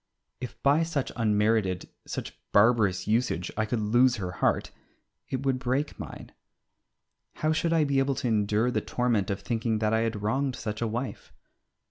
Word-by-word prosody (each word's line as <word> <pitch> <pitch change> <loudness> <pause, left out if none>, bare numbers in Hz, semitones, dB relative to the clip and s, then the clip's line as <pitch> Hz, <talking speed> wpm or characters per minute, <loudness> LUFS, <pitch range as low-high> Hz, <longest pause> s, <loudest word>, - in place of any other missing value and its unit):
If 125 -1 -7
by 145 +3 +4
such 160 -5 -1
unmerited, 105 -4 +1 0.2
such - - -5 0.2
barbarous 105 -4 +4
usage 110 -5 0
I 110 0 0
could 115 +1 -1
lose 120 +4 +4
her 95 -5 -4
heart 90 - 0 0.6
it 130 +1 -3
would 130 -1 +1
break 130 +4 -1
mine. - - -8 1.0
How 155 - 0
should 165 +1 0
I 165 -2 +4
be 140 -2 +2
able 135 0 +1
to 130 - -2
endure 110 +2 +2
the - - 0
torment 120 -6 0
of 100 - -2
thinking 115 -2 -1
that 110 0 +1
I 110 - +3
had 115 -2 -2
wronged 130 +4 0
such 110 -3 -5
a 115 - +1
wife? 120 +4 -5
115 Hz, 170 wpm, -28 LUFS, 105-130 Hz, 1.0 s, by